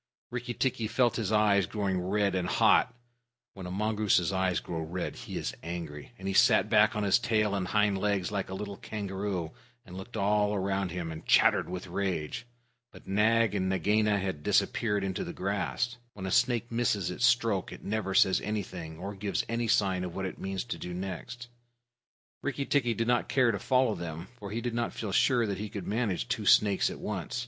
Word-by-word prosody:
Rikki 120 0 -4
tikki 120 -4 0
felt 120 +1 +2
his 110 -3 -2
eyes 105 -4 +3
growing 95 -3 -1
red 100 +1 +1
and 90 -1 -1
hot 125 - +4 0.6
(when 95 -2 -8
a - - -6
mongoose's 105 -2 +1
eyes 95 -1 +1
grow 85 - -5
red, 85 +3 -4
he - - -7
is - - -3
angry), 85 -2 -6
and 95 - -7
he 95 - -1
sat - - +4
back 105 +1 +5
on 105 - -1
his 100 +3 +4
tail 110 -3 +1
and 95 -2 -1
hind 105 0 +2
legs 100 -2 0
like 100 -3 -2
a 95 - -4
little 100 0 -6
kangaroo, 95 -5 -4 0.3
and 90 -3 -11
looked 100 +5 -7
all 105 0 +2
round 95 0 -1
him, 85 -2 -4
and 80 0 -9
chattered - - +4
with 90 0 -5
rage. 95 +3 -3 0.4
But - - -15
Nag 110 +2 +3
and 95 -2 0
Nagaina 105 +3 +2
had 95 -6 -3
disappeared 105 +6 +1
into 95 -1 -2
the - - -6
grass. 105 +5 -2 0.2
When 95 -2 -7
a 95 - -3
snake 120 -1 +2
misses 105 -6 0
its 105 - -4
stroke, 115 -6 +1
it - - -10
never 100 -2 -2
says 95 - +5
anything 90 -6 -4
or 100 +4 -5
gives 100 0 -2
any 115 0 -1
sign 100 -5 +2
of 90 -1 -5
what 95 0 -2
it 95 - -6
means 95 -1 -3
to 120 - -6
do 90 0 -6
next. 95 +6 -6 0.9
Rikki 140 -1 -2
tikki 120 -6 +1
did 115 - 0
not 120 0 +1
care 130 -3 +3
to 100 - -3
follow 130 -3 +2
them, 85 -1 -6
for 100 - -7
he 115 +3 -3
did 120 -1 -3
not 120 0 -1
feel 105 -3 -4
sure 120 +4 +3
that 100 -3 -3
he 105 0 -4
could 100 -2 -6
manage 105 - -1
two - - -2
snakes 100 -2 +5
at - - -7
once. - - -4
100 Hz, 205 wpm, -29 LUFS, 95-110 Hz, 0.9 s, back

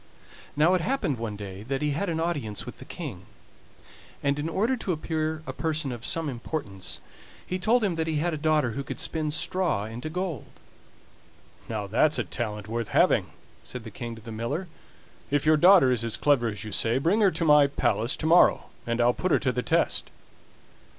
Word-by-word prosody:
Now 155 +5 +4
it 185 - +2
happened 165 - -1
one 110 -2 -4
day 100 -1 -7
that 135 +6 -3
he 150 - +1
had 185 +7 -1
an 160 -1 -1
audience 145 -11 -2
with - - -9
the - - -10
King, - - -7 1.0
and 140 +1 +1
in 155 +2 -2
order 220 +10 +1
to 200 - -3
appear 155 -1 -2
a - - -5
person 155 -4 -1
of 120 -1 -6
some 165 -1 -1
importance 120 - -5 0.5
he 185 - -3
told 225 +6 +3
him 195 -4 +1
that 165 -1 -2
he 160 - -1
had 165 +3 0
a - - -2
daughter 150 -4 +2
who 140 +5 -4
could - - -6
spin 155 -1 -1
straw 155 - 0
into 115 +7 -6
gold. 175 - -4 1.2
"Now 110 -3 -2
that's 125 +10 +2
a - - +1
talent 105 -4 -4
worth 115 0 -3
having," - - +3 0.3
said - - -8
the - - -9
King 120 -1 -6
to 110 - -12
the 115 - -8
miller; 120 +12 -3 0.6
"if 145 0 +1
your 155 0 +6
daughter 175 -4 +6
is 120 -2 0
as 115 -2 -1
clever 140 -5 +3
as 105 -1 -4
you 110 - -7
say, 115 +4 +1
bring 170 +11 +2
her 200 - +6
to 170 - -2
my 150 -2 +6
palace 120 -3 0
to - - -4
morrow, 170 +2 +4 0.2
and 115 0 -1
I'll 120 +1 +4
put 185 - -2
her - - +5
to 130 - 0
the 125 - -1
test." - - +1
145 Hz, 205 wpm, -27 LUFS, 115-165 Hz, 1.2 s, your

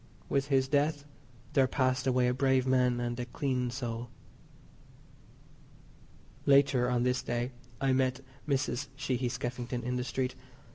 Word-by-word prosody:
With 140 0 +1
his 135 -2 +2
death 145 +1 +1 0.5
there 135 -3 +4
passed 130 0 +1
away 125 -1 +3
a 125 - +2
brave 130 0 +2
man 125 -2 +3
and 120 0 -2
a 120 - -2
clean 130 -3 -1
soul. 120 -2 -4 2.4
Later 135 -3 +5
on 120 -1 +1
this 125 0 +1
day 120 0 -2 0.3
I 135 -1 +2
met 130 0 +1 0.3
Mrs. 130 -3 0
Sheehy 130 -2 -1
Skeffington 120 0 -4
in 125 +1 -1
the 125 - -1
street. 130 -1 -2
130 Hz, 140 wpm, -31 LUFS, 125-135 Hz, 2.4 s, Later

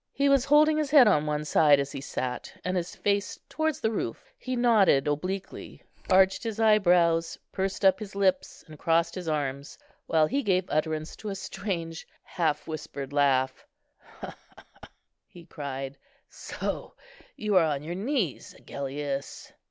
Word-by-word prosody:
He 280 +1 +2
was 275 -2 +4
holding 305 +2 +5
his 300 -2 -1
head 275 -5 +7
on 155 -7 +3
one 150 0 -2
side 150 -2 +5
as 140 0 -2
he - - -6
sat, 125 -2 -4
and 185 +1 -1
his 180 -1 -3
face 200 0 -1
towards 315 -1 -1
the 220 - 0
roof; 120 - -5
he 255 0 -5
nodded 220 - +4
obliquely, 185 +7 -4 0.3
arched 190 0 +4
his 225 -2 -5
eyebrows, 175 -6 +3
pursed 195 +1 -2
up 190 -1 +5
his 200 -3 -8
lips, 190 -2 0
and 155 -1 -13
crossed 165 +1 +1
his 180 -3 -6
arms, 140 -2 -3 0.3
while 160 -1 +3
he 275 - -1
gave 185 -6 +1
utterance 155 +1 -2
to 215 - -6
a 195 - -4
strange, 170 -5 -5 0.2
half 155 -4 -2
whispered 145 -3 -6
laugh. 130 -2 +1 0.5
"He, - - -10
he, - - -9 0.9
he!" 175 - -15
he - - -17
cried; 135 -3 -6 0.3
"so - - -5 0.4
you 210 -2 -1
are 180 -3 +6
on 145 -2 -2
your 165 +3 -5
knees, 205 - -2
Agellius." 140 0 -6
170 Hz, 160 wpm, -27 LUFS, 150-205 Hz, 0.9 s, head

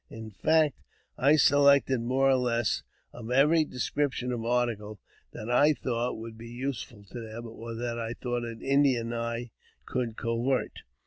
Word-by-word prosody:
In 110 -1 -9
fact, 155 +7 +2 0.4
I 140 +4 +4
selected 140 -3 +5
more 130 +3 +2
or 135 -1 +5
less 120 -3 0 0.3
of 115 -1 -8
every 150 +6 +4
description 130 -1 -2
of 120 -2 -3
article 115 -4 -1 0.3
that 110 - -8
I 145 +5 +4
thought 120 -3 -2
would 110 0 -9
be 115 0 -9
useful 120 -3 -5
to 120 - -6
them, 115 +1 -7
or 115 0 -8
that 120 0 -3
I 115 0 -3
thought 120 -1 -3
an 115 -1 -7
Indian 135 -4 +2
eye 115 0 -3 0.3
could 120 -3 -3
covet. 120 +3 0
120 Hz, 155 wpm, -28 LUFS, 115-135 Hz, 0.4 s, selected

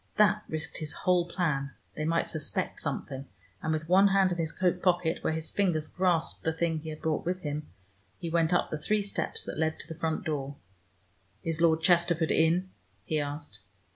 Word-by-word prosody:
That 210 0 +4
risked 155 +1 -4
his 155 -2 -1
whole 180 -1 +2
plan: 140 -7 -1 0.2
they 155 - -3
might 165 +1 +1
suspect 170 +4 -1
something, 135 -2 -3 0.3
and 155 - -1
with 155 0 -1
one 190 +3 +6
hand 195 -1 +4
in 175 - -2
his 160 -1 -1
coat 180 -1 0
pocket, 175 -2 +2
where - - +1
his 160 0 -1
fingers 175 -6 +1
grasped 180 -2 0
the 160 - +1
thing 160 0 0
he 160 +1 -7
had 155 0 -8
brought 160 -1 0
with 180 +2 -2
him, 150 -1 -4 0.5
he 170 - -5
went 165 0 +2
up 175 - +2
the 155 - -2
three 210 +6 +1
steps 200 - -2
that - - -5
led 160 0 +1
to - - -6
the 165 - -5
front 160 +1 -2
door. 145 -3 -2 0.9
"Is 165 0 -1
Lord 160 -1 +4
Chesterford 170 -2 +3
in?" 170 +4 +2 0.3
he 155 - 0
asked. 145 -6 -5
165 Hz, 200 wpm, -29 LUFS, 155-180 Hz, 0.9 s, one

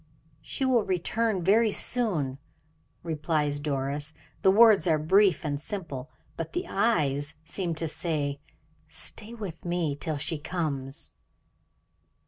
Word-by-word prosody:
"She 270 - -2
will 255 -3 +4
return 190 +2 0
very 215 +5 +4
soon," 175 - +1 0.6
replies 150 -2 0
Doris. 145 +1 -2 0.3
The - - +5
words 210 -1 +7
are 160 -2 +4
brief 185 +2 +3
and 145 -1 -2
simple, 155 -8 -5 0.3
but 165 -1 -5
the - - -2
eyes 150 -9 +1
seem 170 -1 -2
to 165 +1 -2
say, 145 -3 0 0.5
"stay 225 +2 -4
with 195 -8 -7
me 170 -4 -1
till 155 +1 -3
she 150 +2 0
comes." 150 -3 -3
165 Hz, 120 wpm, -28 LUFS, 145-195 Hz, 0.6 s, words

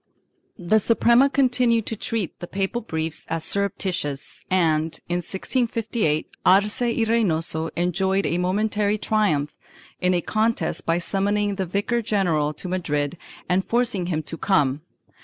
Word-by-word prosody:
1 175 -1 -10
The 220 - +6
Suprema 235 +5 +4
continued 250 -5 +2
to 225 - -3
treat 215 -3 -3
the 175 - -6
papal 195 +6 -2
briefs 160 -6 -3
as 165 -1 -2
surrep 200 -1 0
titious 150 -7 -3
and, 160 -3 +1
in 175 - 0
1658, 215 - -1 0.2
Arce 205 +5 +4
y 235 -1 +1
Reynoso 165 -8 +1
enjoyed 190 +3 +1
a 170 - 0
momentary 210 +3 +1
triumph 165 -10 +1 0.5
in 180 0 +2
a 175 - +1
contest 220 +5 -1
by 165 0 +3
summoning 205 +3 0
the 190 -2 -3
vicar 205 +6 0
general 175 -9 +1
to 155 +4 -7
Madrid 150 -5 -1 0.3
and 185 +1 +2
forcing 230 -7 0
him 160 -3 -1
to 165 - -6
come. 150 -8 +2
190 Hz, 145 wpm, -23 LUFS, 165-220 Hz, 0.5 s, The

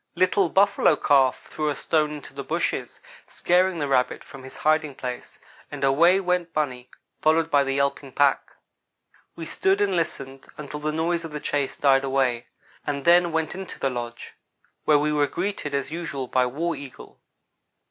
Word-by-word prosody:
Little 185 +1 +2
Buffalo 200 -4 +3
Calf 135 -3 +2
threw 155 -1 -1
a 145 - -1
stone 155 0 0
into 150 -2 -9
the 140 0 -6
bushes, - - -3 0.3
scaring 180 +1 +1
the 145 -2 -2
rabbit 130 -2 +1
from 135 - -12
his 130 0 -12
hiding 155 -2 +1
place, 125 -1 -7 0.3
and - - -7
away 165 +8 +4
went 180 -2 -1
bunny, 130 -5 -2 0.3
followed 160 +1 +2
by 145 -1 +4
the 135 0 -2
yelping 140 0 -1
pack. 140 -2 +1 0.8
We 165 - -7
stood 190 +4 +1
and 200 -2 +1
listened 135 -5 -4
until 150 0 -7
the 155 +1 -2
noise 165 +2 -1
of 165 -2 -8
the 150 - -4
chase 145 -2 -2
died 135 -1 +3
away, 130 -3 0 0.4
and 140 -1 -3
then 175 0 +5
went 160 -1 -1
into 190 0 -8
the 135 - 0
lodge, 120 -1 -6 0.5
where 150 -1 +5
we 150 +1 0
were 145 -1 +2
greeted, 175 -5 -3
as 140 +1 -2
usual, 160 -5 -4
by 125 0 +1
War 165 +7 -2
Eagle. 140 -3 -11
150 Hz, 175 wpm, -24 LUFS, 135-170 Hz, 0.8 s, then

